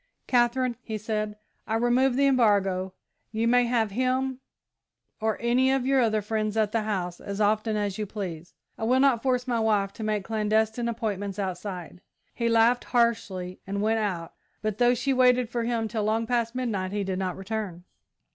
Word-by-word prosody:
"Katherine," 245 Hz, 0 st, +2 dB
he 220 Hz, -3 st, -4 dB
said, 215 Hz, 0 st, -3 dB, 0.3 s
"I 220 Hz, -, 0 dB
remove 245 Hz, +3 st, +3 dB
the 280 Hz, +2 st, +3 dB
embargo; 200 Hz, -8 st, +2 dB, 0.4 s
you 225 Hz, +1 st, 0 dB
may 245 Hz, +1 st, +4 dB
have 230 Hz, -3 st, +1 dB
him 255 Hz, +3 st, 0 dB, 0.8 s
or 220 Hz, 0 st, 0 dB
any 250 Hz, +3 st, +3 dB
of 265 Hz, -2 st, +1 dB
your 270 Hz, 0 st, +3 dB
other 220 Hz, -3 st, +1 dB
friends 215 Hz, 0 st, -1 dB
at 215 Hz, -2 st, +2 dB
the 225 Hz, -, +1 dB
house 185 Hz, -5 st, -3 dB
as 200 Hz, 0 st, -6 dB
often 215 Hz, +1 st, +1 dB
as 205 Hz, 0 st, -2 dB
you 210 Hz, -, -2 dB
please. 175 Hz, -5 st, -6 dB, 0.2 s
I -, -, -4 dB
will 255 Hz, +3 st, +3 dB
not 265 Hz, -4 st, +4 dB
force 250 Hz, -1 st, 0 dB
my 240 Hz, -2 st, +1 dB
wife 210 Hz, -3 st, +1 dB
to 220 Hz, -, -7 dB
make 215 Hz, -2 st, -1 dB
clandestine 220 Hz, +2 st, 0 dB
appointments 205 Hz, -4 st, -3 dB
outside!" 185 Hz, -2 st, -5 dB, 0.3 s
He 235 Hz, -1 st, 0 dB
laughed 230 Hz, +2 st, +4 dB
harshly 200 Hz, -7 st, 0 dB
and 200 Hz, +1 st, -2 dB
went 220 Hz, +2 st, +1 dB
out, 180 Hz, -6 st, -3 dB, 0.3 s
but, 215 Hz, 0 st, -2 dB
though 245 Hz, 0 st, +4 dB
she 270 Hz, +3 st, 0 dB
waited 250 Hz, -2 st, +3 dB
for 235 Hz, -1 st, -1 dB
him 230 Hz, -2 st, 0 dB
till 220 Hz, -1 st, -2 dB
long 220 Hz, +2 st, +1 dB
past 235 Hz, 0 st, 0 dB
midnight, 210 Hz, -7 st, -2 dB
he 205 Hz, 0 st, -1 dB
did 190 Hz, -1 st, -2 dB
not 185 Hz, -2 st, -2 dB
return. 195 Hz, -3 st, -4 dB
220 Hz, 185 wpm, -26 LUFS, 205-240 Hz, 0.8 s, may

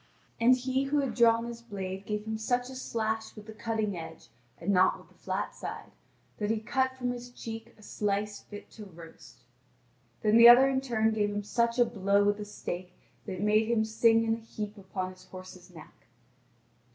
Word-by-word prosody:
And 240 Hz, +2 st, +6 dB
he 260 Hz, +1 st, -1 dB
who 285 Hz, +2 st, 0 dB
had 275 Hz, -3 st, 0 dB
drawn 230 Hz, -1 st, +4 dB
his 235 Hz, 0 st, -7 dB
blade 195 Hz, -3 st, -6 dB
gave 210 Hz, 0 st, -3 dB
him 220 Hz, 0 st, -3 dB
such 245 Hz, +3 st, -1 dB
a -, -, -9 dB
slash 220 Hz, -3 st, -3 dB
with 210 Hz, -1 st, -11 dB
the 220 Hz, -, -9 dB
cutting 215 Hz, -2 st, -2 dB
edge, 160 Hz, -1 st, -9 dB, 0.3 s
and 200 Hz, -, -1 dB
not 185 Hz, -1 st, +4 dB
with -, -, -18 dB
the -, -, -23 dB
flat -, -, -2 dB
side, -, -, -7 dB, 0.5 s
that 210 Hz, -1 st, -1 dB
he 220 Hz, 0 st, +1 dB
cut 260 Hz, +3 st, -1 dB
from 250 Hz, -1 st, -1 dB
his 245 Hz, 0 st, -7 dB
cheek 225 Hz, -1 st, -8 dB
a 215 Hz, -, -18 dB
slice 205 Hz, 0 st, -2 dB
fit 205 Hz, -1 st, -11 dB
to 215 Hz, -, -10 dB
roast. 165 Hz, -3 st, -14 dB, 0.8 s
Then 215 Hz, +1 st, +5 dB
the 235 Hz, 0 st, +10 dB
other 255 Hz, +3 st, +8 dB
in 265 Hz, -1 st, +1 dB
turn 225 Hz, -4 st, +1 dB
gave 210 Hz, -1 st, +1 dB
him 205 Hz, 0 st, -3 dB
such 235 Hz, +3 st, 0 dB
a 245 Hz, -, +5 dB
blow 200 Hz, -2 st, +2 dB
with 205 Hz, 0 st, +2 dB
the 210 Hz, -, -6 dB
stake 180 Hz, -3 st, -6 dB, 0.3 s
that 195 Hz, -, -3 dB
it 185 Hz, -, -6 dB
made 215 Hz, +1 st, +3 dB
him 225 Hz, -2 st, +2 dB
sing 225 Hz, +1 st, +3 dB
in 225 Hz, 0 st, +1 dB
a -, -, -2 dB
heap 215 Hz, -2 st, -7 dB
upon 190 Hz, -2 st, -5 dB
his 185 Hz, 0 st, -16 dB
horse's 185 Hz, -1 st, -11 dB
neck. 160 Hz, -8 st, -15 dB
220 Hz, 205 wpm, -29 LUFS, 205-235 Hz, 0.8 s, the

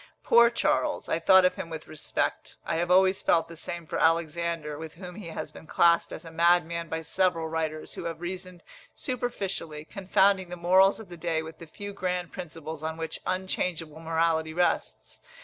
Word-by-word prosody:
Poor 235 Hz, 0 st, +6 dB
Charles! 235 Hz, -, 0 dB
I -, -, 0 dB
thought 190 Hz, -1 st, +6 dB
of 180 Hz, -, +2 dB
him 165 Hz, -, -5 dB
with 160 Hz, -1 st, -7 dB
respect. 155 Hz, -, -2 dB
I -, -, -1 dB
have 175 Hz, +1 st, -1 dB
always 190 Hz, +1 st, +4 dB
felt 165 Hz, -1 st, +3 dB
the 165 Hz, -, -10 dB
same 170 Hz, +1 st, -5 dB
for -, -, -3 dB
Alexander, 165 Hz, -1 st, +1 dB
with 160 Hz, 0 st, -8 dB
whom 180 Hz, 0 st, -9 dB
he 195 Hz, -2 st, -9 dB
has 165 Hz, -, -6 dB
been 160 Hz, -, -13 dB
classed 170 Hz, +1 st, +3 dB
as 165 Hz, -, -8 dB
a 165 Hz, -, -9 dB
madman 170 Hz, 0 st, +2 dB
by 160 Hz, +1 st, -2 dB
several 170 Hz, -1 st, 0 dB
writers, 160 Hz, -1 st, -3 dB
who -, -, -7 dB
have 165 Hz, -1 st, -4 dB
reasoned 180 Hz, 0 st, -6 dB, 0.3 s
superficially, 195 Hz, -11 st, -4 dB
confounding 190 Hz, 0 st, +2 dB
the 180 Hz, -, -5 dB
morals 185 Hz, +4 st, +4 dB
of 220 Hz, -5 st, -11 dB
the 175 Hz, -, -9 dB
day 165 Hz, -1 st, -1 dB
with 160 Hz, 0 st, -10 dB
the 165 Hz, -, -10 dB
few 205 Hz, +5 st, -8 dB
grand 180 Hz, -2 st, -2 dB
principles 160 Hz, -3 st, -7 dB
on 160 Hz, 0 st, -3 dB
which 160 Hz, -1 st, -5 dB
unchangeable 180 Hz, -4 st, -2 dB
morality 160 Hz, -1 st, 0 dB
rests. 180 Hz, 0 st, -1 dB
170 Hz, 185 wpm, -28 LUFS, 160-185 Hz, 0.3 s, Poor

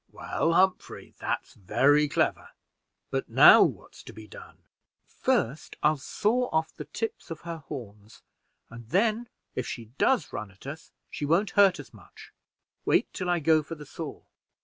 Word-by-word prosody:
"Well, 165 Hz, -, -1 dB
Humphrey, 190 Hz, +2 st, 0 dB
that's -, -, -3 dB
very 145 Hz, +9 st, +3 dB
clever; 140 Hz, -, -1 dB, 0.6 s
but -, -, -2 dB
now -, -, +8 dB
what -, -, 0 dB
is -, -, -13 dB
to -, -, -10 dB
be 110 Hz, -, -11 dB
done?" -, -, -13 dB, 0.5 s
"First, 135 Hz, +7 st, -1 dB
I'll 150 Hz, 0 st, +3 dB
saw 235 Hz, -, 0 dB
off 160 Hz, 0 st, -1 dB
the -, -, -7 dB
tips 225 Hz, 0 st, -5 dB
of 165 Hz, -2 st, -7 dB
her 170 Hz, -1 st, -6 dB
horns, 110 Hz, -8 st, -10 dB, 0.5 s
and 115 Hz, -1 st, -11 dB
then 220 Hz, -, +1 dB, 0.2 s
if 130 Hz, -, -3 dB
she 115 Hz, -2 st, -7 dB
does 265 Hz, -, +2 dB
run 110 Hz, -, -5 dB
at 95 Hz, +5 st, -19 dB
us, 150 Hz, +4 st, -8 dB, 0.2 s
she -, -, -6 dB
won't 170 Hz, +8 st, +2 dB
hurt 195 Hz, -4 st, +4 dB
us 145 Hz, -, -11 dB
much. 105 Hz, -5 st, -16 dB, 0.5 s
Wait -, -, +1 dB
till 180 Hz, -, -3 dB
I 175 Hz, -, +2 dB
go 160 Hz, 0 st, +3 dB
for 165 Hz, +2 st, -8 dB
the 150 Hz, -1 st, -11 dB
saw." 155 Hz, +2 st, -8 dB
155 Hz, 170 wpm, -27 LUFS, 130-180 Hz, 0.6 s, now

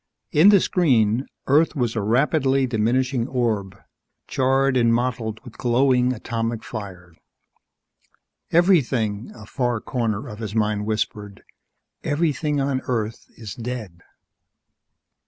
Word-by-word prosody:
In 160 Hz, +7 st, +6 dB
the 205 Hz, -2 st, +7 dB
screen, 125 Hz, -, +2 dB, 0.2 s
Earth 155 Hz, +4 st, +3 dB
was 120 Hz, -5 st, -1 dB
a 110 Hz, -, 0 dB
rapidly 135 Hz, +4 st, +2 dB
diminishing 125 Hz, +2 st, 0 dB
orb, 110 Hz, -7 st, -1 dB, 0.5 s
charred 135 Hz, +1 st, +2 dB
and 115 Hz, -2 st, +3 dB
mottled 115 Hz, -2 st, -1 dB
with 120 Hz, -4 st, -13 dB
glowing 125 Hz, 0 st, +3 dB
atomic 115 Hz, -1 st, -3 dB
fires. 90 Hz, -6 st, -8 dB, 1.3 s
Everything, 130 Hz, -, +2 dB
a 110 Hz, -, -11 dB
far 120 Hz, 0 st, -1 dB
corner 110 Hz, -4 st, -2 dB
of 105 Hz, -, -9 dB
his 110 Hz, -2 st, -5 dB
mind 105 Hz, -1 st, 0 dB
whispered. 105 Hz, -2 st, -3 dB, 0.6 s
_Everything 150 Hz, -1 st, 0 dB
on 135 Hz, -1 st, 0 dB
Earth 115 Hz, -3 st, -3 dB
is 110 Hz, -4 st, -7 dB
dead! 115 Hz, -8 st, -6 dB
120 Hz, 115 wpm, -23 LUFS, 110-135 Hz, 1.3 s, the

